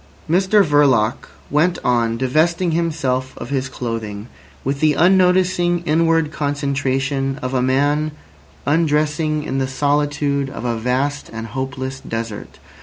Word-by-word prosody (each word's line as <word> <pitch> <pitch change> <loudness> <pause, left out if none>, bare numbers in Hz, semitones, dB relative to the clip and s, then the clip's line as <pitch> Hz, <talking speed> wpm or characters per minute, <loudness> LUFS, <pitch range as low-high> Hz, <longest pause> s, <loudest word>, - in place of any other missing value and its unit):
Mr 190 +4 +3
Verloc 140 -7 +2 0.2
went 165 +5 +2
on 115 -2 +1
divesting 160 +7 +1
himself 150 -6 -1
of 120 - -7
his 135 -1 -1
clothing 115 -4 -5 0.4
with 135 +1 -2
the 155 0 +3
unnoticing 180 -1 +3
inward 165 -1 +2
concentration 140 -2 -1
of 130 +1 -3
a 130 - +1
man 145 +4 +1 0.6
undressing 155 0 +1
in 135 -2 -2
the 135 - 0
solitude 145 0 0
of 125 - -7
a 120 -1 0
vast 130 +5 -1
and 115 0 -6
hopeless 130 +1 -4
desert. 115 -3 -6
140 Hz, 125 wpm, -19 LUFS, 130-155 Hz, 0.6 s, Mr